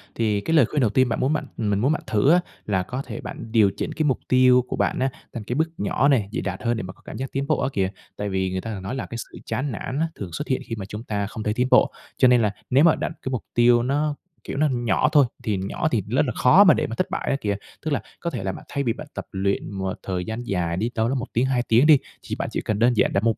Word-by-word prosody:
Thì 105 -3 +1
cái 165 - -1
lời 145 - +6
khuyên 145 +4 -1
đầu 115 - +3
tiên 130 +4 +3
bạn - - -1
muốn 135 +4 +1
bạn 150 - -1
mình 105 -3 0
muốn 135 +7 +2
bạn 155 - -1
thử 110 +8 +3
á, 175 - +6 0.3
là 95 -3 0
có 125 +8 -4
thể 120 -4 -7
bạn 115 - -8
điều 110 -4 +4
chỉnh - - -3
cái 155 - -1
mục 140 -4 +1
tiêu 125 0 +5
của - - -3
bạn - - 0
á, 130 - +2 0.2
thành 115 - -5
cái 120 +4 -3
bước 160 +2 +1
nhỏ 120 +6 +1
này, 125 -8 +3
dễ - - -2
đạt 95 -1 -4
hơn 120 -1 +1
để - - -3
mà 95 +1 -7
có - - -25
cảm - - -7
giác 135 +1 -4
tiến 140 +1 -2
bộ - - +2
á - - 0
kìa. 95 -1 +1 0.3
Tại 105 0 -3
vì 95 -1 -1
người 95 0 -2
ta 115 -1 -5
thường 95 - -7
nói 100 +7 -4
là 135 - -3
cái 115 - -7
sự - - -8
chán 135 +2 -2
nản 125 +5 -4
á, 165 - +2
thường 95 -4 -6
xuất - - -4
hiện 130 0 0
khi 115 - -4
mà 95 - -5
chúng 105 +3 -7
ta 100 -4 -2
không 110 0 -6
thấy 105 - 0
tiến 125 +3 +1
bộ. - - +5 0.3
Cho 130 - +6
nên 125 -1 +5
là 105 - +2 0.2
nếu 135 +4 +5
mà 165 -2 +6
đặt - - -2
cái 130 - -4
mục 125 - -2
tiêu 120 0 +5
nó, 145 +3 0 0.3
kiểu, - - -5
nó 150 +1 +3
nhỏ 120 -2 +1
thôi, 145 -3 +6 0.2
thì 105 -3 0
nhỏ 95 +11 -2
thì 115 - +2
rất 130 +7 +2
là 125 - -1
khó 155 +11 +6
mà 185 -7 +7
để - - -1
mà 115 - -5
thất - - -1
bại - - -3
á - - +2
kìa. 100 -1 0 0.3
Tức 155 - -3
là 140 - 0 0.2
có 170 - -2
thể 95 - -5
là 95 - -1
bạn - - -10
thay 140 - -1
vì 115 -4 +1
bạn 150 - -9
tập - - -6
luyện 100 +1 -1
một 95 -1 -3
thời 90 -2 -3
gian 110 +2 -4
dài 85 -6 -1
đi, 110 +5 0
đâu 110 0 +1
đó 135 - 0
1 125 -1 -3
tiếng, 120 +3 +2
2 130 -2 +1
tiếng 120 +6 +5
đi, 150 -3 +8 0.3
thì - - -4
bạn - - -3
chỉ - - -2
cần 105 -1 -2
đơn 120 +1 +4
giản - - +3
đặt 100 - +1
mục 115 -1 +2
120 Hz, 320 wpm, -24 LUFS, 105-135 Hz, 0.3 s, đi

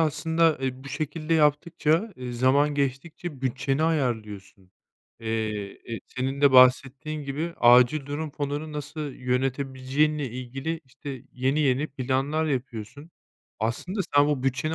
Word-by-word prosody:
aslında, 160 +1 +2
eee, 130 0 -3
bu - - -7
şekilde 155 +2 -2
yaptıkça, 160 +5 +2
eee, 125 -1 -6
zaman 135 +4 +3
geçtikçe 140 +2 -3
bütçeni 135 +2 -1
ayarlıyorsun. 105 - -2 0.5
Eee, 110 -1 -4
e, - - -9
senin 135 +2 -3
de 140 -2 +5
bahsettiğin 135 +4 +4
gibi 155 +5 -3
acil 125 +4 +6
durum 150 +2 -4
fonunu 145 +1 -4
nasıl 150 +2 -6
yönetebileceğinle 135 +3 -1
ilgili, 135 +7 -5
işte, 130 0 -8
yeni 135 +4 0
yeni 140 +1 +2
planlar 135 +3 -1
yapıyorsun. 135 +1 -4 0.5
Aslında 120 - -2
sen 145 0 +6
bu 145 -3 0
bütçeni 135 +5 0
140 Hz, 125 wpm, -26 LUFS, 130-155 Hz, 0.5 s, acil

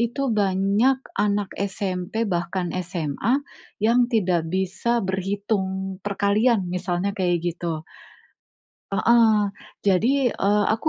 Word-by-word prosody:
itu 240 +4 0
banyak 200 +6 +2 0.2
anak 205 -1 0
SMP, 195 +2 -2
bahkan 175 -1 -2
SMA, 180 - -1 0.5
yang 240 +2 +4
tidak 180 -7 +1
bisa 190 +6 0
berhitung 190 0 -2
perkalian, 205 +1 +2
misalnya 180 +2 -1
kayak 175 -4 0
gitu. 165 -2 -4 1.1
Heeh. 195 +4 +1 0.8
Jadi, 200 +6 +4 0.2
eee, 205 +1 +2
aku 270 +8 -2
195 Hz, 100 wpm, -23 LUFS, 180-215 Hz, 1.1 s, yang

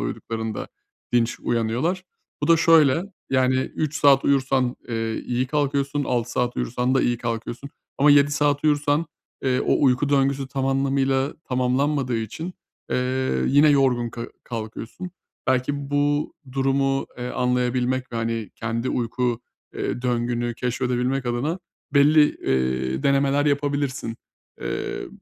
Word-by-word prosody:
uyuduklarında 110 - -4 0.4
dinç 120 -1 +1
uyanıyorlar. 120 +11 -1 0.4
Bu 145 - 0
da 165 - +7
şöyle, 160 -2 +5 0.3
yani, 130 -1 +3
3 150 +3 -2
saat 140 -1 +5
uyursan, 130 -2 +2
eee, 115 -1 -2
iyi 125 +1 0
kalkıyorsun, 140 0 0
6 120 -2 -1
saat 125 0 -1
uyursan 125 +2 0
da 135 - +4
iyi 120 - +1
kalkıyorsun 120 +3 -4 0.3
ama 145 +2 +6
7 145 0 +6
saat 145 0 +1
uyursan, 150 +1 +2 0.4
eee, 130 -1 +1
o - - +2
uyku 130 +2 +3
döngüsü 140 -1 +1
tam 135 -1 -2
anlamıyla 135 +1 +1
tamamlanmadığı 130 +1 0
için, 120 - -5 0.4
eee, 130 +1 0
yine 145 +3 +5
yorgun 130 -4 +3
ka 115 0 -6 0.2
kalkıyorsun. 115 +9 -6 0.4
Belki 140 +2 0
bu 145 +1 +1 0.2
durumu, 135 0 +1
eee, 125 0 -4
anlayabilmek 125 +1 0
ve, - - -3
hani, 115 -1 -2
kendi 115 +2 -3
uyku, 120 0 -1 0.3
eee, 120 - -3
döngünü 120 -1 -1
keşfedebilmek 125 +2 -1
adına 130 +9 -1 0.4
belli, 150 +2 +6
eee, 65 0 -1
denemeler 140 +1 +2
yapabilirsin. 140 -4 -1 0.4
Eee, - - -4
130 Hz, 130 wpm, -23 LUFS, 120-140 Hz, 0.4 s, da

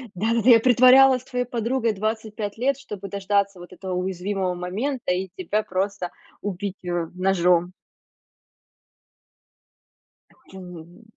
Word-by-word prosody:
Да-да-да. 225 +5 +2
Я 230 -1 +8
притворялась 255 +2 +6
твоей 250 -2 -2
подругой 235 0 -1
25 215 0 -4
лет, 270 +3 +1
чтобы 205 -7 -8
дождаться 200 -1 -1
вот 175 0 -12
этого 190 -1 -7
уязвимого 185 +1 -2
момента 200 +6 -3
и 185 +1 -3
тебя 205 +4 -1
просто 190 -1 -3 0.3
убить, 200 0 -4
э, 175 -2 -2
ножом. 180 -1 +2 2.7
Это 190 - -14
ню 180 -3 -10
ни. 175 +7 -19
200 Hz, 120 wpm, -23 LUFS, 180-230 Hz, 2.7 s, Я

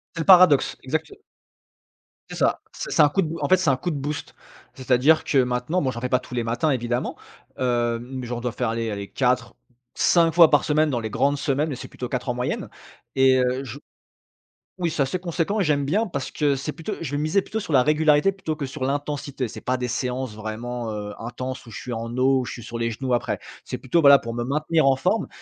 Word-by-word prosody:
C'est 165 - -2
le - - -3
paradoxe 180 -7 +6
exacte 155 - -2 1.2
C'est - - -6
ça, - - +1
c'est - - -6
c'est 160 - +4
un 145 - +6
coup 190 +5 +1
de - - -2
b 165 +1 -5
en - - -1
fait 185 - +6
c'est 165 -7 +2
un - - +2
coup 175 - -3
de 155 - -2
boost. 145 +2 -5 0.4
C'est-à-dire 130 +4 +3
que 135 - +2
maintenant, 125 +8 0
bon 130 - 0
j'en 120 -2 -4
fais 125 +1 -3
pas 125 - +3
tous 125 - -10
les 120 - 0
matins 120 +7 0
évidemment, 120 -2 -1 0.4
heu, 120 -2 +1
mais 125 0 -7
genre 120 0 -3
je - - -10
dois 125 - -1
faire 110 - -2
allez 115 -1 -2
allez 100 -1 -5
4-5 125 +5 0
fois 165 -3 +7
par 145 - +4
semaine 155 0 +2
dans 120 - 0
les 110 -1 -4
grandes 140 +5 +1
semaines, 145 +2 0
mais 135 - -3
c'est - - -8
plutôt 125 - -6
4 125 0 -3
en 120 - 0
moyenne 125 - -3 0.5
et 130 -1 +5
heu, 125 +2 0
je 135 +2 -8 1.0
oui 170 -2 0
c'est 145 - 0
assez 135 +7 -1
conséquent 180 +4 -1
et - - +2
j'aime 145 -2 +1
bien 205 +11 +1
parce 140 -6 -4
que 145 -2 +1
c'est 145 +3 -4
plutôt 165 - -5
je 155 -5 -4
vais 145 - -1
miser 155 +6 +1
plutôt 220 - -4
sur 165 - -6
la 130 - +6
régularité 150 +4 +3
plutôt 160 -5 -4
que 140 -3 -3
sur 135 0 -8
l'intensité, 140 -1 -2
c'est - - -9
pas 130 0 -1
des 125 -1 -3
séances 125 -1 -3
vraiment, 115 +2 -5
heu, 105 0 -5
intenses 125 +3 -6
où - - -11
je - - -7
suis 125 - -6
en 115 +1 -4
eau, 130 0 +3
où - - -3
je - - -6
suis 120 - -9
sur 115 0 -6
les 115 0 -1
genoux 125 +2 -2
après. 120 - -1 0.3
C'est - - -5
plutôt 150 +6 +1
voilà, 140 -2 +8
pour 115 0 -6
me 120 - -2
maintenir 150 +3 +1
en 135 -1 +4
forme 185 +9 0
135 Hz, 245 wpm, -23 LUFS, 125-155 Hz, 1.2 s, voilà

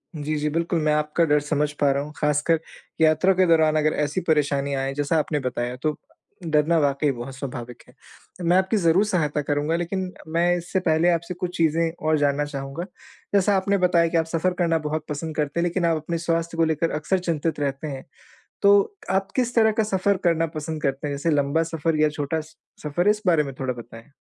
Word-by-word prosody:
जी, 155 +1 -3
जी 150 +1 -1
बिल्कुल। 165 +1 0
मैं 150 0 +2
आपका 150 +2 +1
डर 150 -1 +3
समझ 150 0 -1
पा 145 -1 +4
रहा 140 +1 0
हूँ 150 - -9
ख़ासकर 150 +2 +1 0.4
यात्रा 160 +4 +4
के 185 0 +3
दौरान 160 -2 +4
अगर 155 0 +2
ऐसी 150 +6 -2
परेशानियाँ 140 -3 +1
आए 135 0 -2
जैसा 145 +3 0
आपने 150 -1 -1
बताया 125 -1 -3
तो 155 -1 0 0.5
डरना 155 +1 +2
वाक़ई 140 0 +1
बहुत 125 +1 -7
स्वाभाविक 125 -3 -7
है। - - -19 0.5
मैं 175 +2 +4
आपकी 190 +3 +2
ज़रूर 180 +3 +3
सहायता 150 -7 0
करूँगा। 145 +2 -1
लेकिन 180 +2 -3 0.2
मैं 175 +1 +3
इससे 175 +2 -2
पहले 170 -1 +2
आपसे 170 +2 -2
कुछ 180 0 -5
चीज़ें 165 0 +2 0.2
और 155 0 +3
जानना 145 0 +1
चाहूँगा। 140 +3 -5 0.5
जैसा 200 0 +3
आपने 200 +1 +1
बताया 175 -2 +3
कि 165 0 0
आप 160 - +2
सफ़र 165 +3 0
करना 165 -2 +2
बहुत 155 0 -3
पसंद 155 +2 -4
करते 150 +2 -1
हैं - - +2
लेकिन 175 0 -1
आप 165 -1 +2
अपने 165 +2 -3
स्वास्थ्य 165 0 -2
को 165 - +4
लेकर 160 +1 0
अक्सर 155 +5 0
चिंतित 165 -3 -2
रहते 140 +1 -2
हैं। 135 -2 -6 0.6
तो 200 - +7 0.4
आप 190 +1 0
किस 245 -1 0
तरह 220 -2 +4
का - - +4
सफ़र 200 0 +1
करना 165 -1 +2
पसंद 155 0 -5
करते 135 +1 -1
हैं 140 - -3
जैसे 150 +4 -1
लम्बा 145 +2 +2
सफ़र 165 -1 -1
या 155 - +5
छोटा 150 +1 -2
स 160 +1 -13 0.3
सफ़र? 175 +6 0
इस 210 0 +2
बारे 165 -4 +4
में 135 -2 -6
थोड़ा 130 -1 -1
बताएँ। 115 +2 -12
155 Hz, 210 wpm, -24 LUFS, 145-170 Hz, 0.6 s, तो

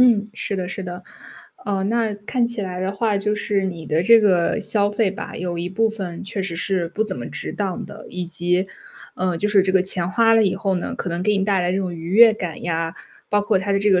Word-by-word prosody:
嗯， 225 -4 +5
是 205 -3 -3
的 180 -1 -3
是 185 +1 -5
的。 180 0 -6 0.6
嗯， 195 -1 -1
那 225 -2 0
看 235 +4 -1
起 235 -2 -4
来 180 -1 -4
的 190 +1 -1
话， 210 +1 0
就 210 +1 0
是 205 -2 0
你 170 -4 -5
的 155 +2 +1
这 230 +4 +7
个 190 0 +2
消 205 0 +2
费 205 -1 +1
吧， 200 - -7
有 175 -1 -3
一 175 - -2
部 220 +4 +1
分 190 -6 -6
确 195 0 -4
实 185 -3 -4
是 180 -1 -1
不 210 +5 -1
怎 200 -3 -4
么 - - -5
值 - - -5
当 195 -3 -3
的， 210 +1 -11
以 180 -1 -4
及 180 +2 0 0.5
嗯， 185 -1 0
就 210 - 0
是 205 -2 +5
这 190 0 0
个 190 -1 +4
钱 180 -2 -1
花 225 +2 +4
了 225 -1 +5
以 190 - +1
后 195 0 -1
呢， 175 - -3
可 180 - -4
能 170 +1 -2
给 210 +2 +2
你 195 - +1
带 195 -2 +2
来 175 0 0
这 190 - 0
种 185 -2 -2
愉 165 +1 -7
悦 225 +3 +8
感 180 -6 -5
呀， 165 -1 -2 0.3
包 205 0 +2
括 205 -2 +2
它 200 +1 -1
的 195 - +3
这 205 - +3
个 185 -2 +5
195 Hz, 280 characters per minute, -21 LUFS, 180-210 Hz, 0.6 s, 悦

